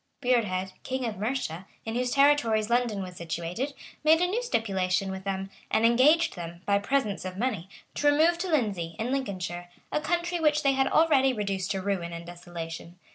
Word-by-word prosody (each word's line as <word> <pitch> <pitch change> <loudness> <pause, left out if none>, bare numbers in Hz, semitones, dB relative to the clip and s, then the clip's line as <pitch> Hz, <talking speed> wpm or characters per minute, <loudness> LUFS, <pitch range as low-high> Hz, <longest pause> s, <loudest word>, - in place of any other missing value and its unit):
Burrhed, 205 -8 0
king 260 -1 -3
of 220 -4 -4
Mercia, 205 -6 -3 0.2
in 225 - -3
whose 250 +1 0
territories 245 -6 +3
London 235 -5 +1
was 180 -1 -9
situated, 170 - -4 0.3
made 315 +1 +6
a 360 - +3
new 410 +7 -1
stipulation 195 - 0
with 190 0 -7
them, 195 0 -3 0.2
and 220 - +2
engaged 270 +8 +4
them, 170 -1 -8
by 200 0 +3
presents 215 -2 0
of 185 0 -6
money, 210 -6 -2 0.2
to 290 - 0
remove 320 +4 +4
to 375 - -2
Lindesey, 200 - 0
in 235 +3 -2
Lincolnshire, 185 -9 -3 0.2
a 300 - 0
country 345 +2 -1
which 300 -1 +2
they 275 - +4
had 270 0 +2
already 270 -5 +4
reduced 200 -4 -2
to 195 -2 -2
ruin 185 -4 -2
and 170 0 -7
desolation. 170 -1 -8
220 Hz, 185 wpm, -28 LUFS, 185-275 Hz, 0.3 s, made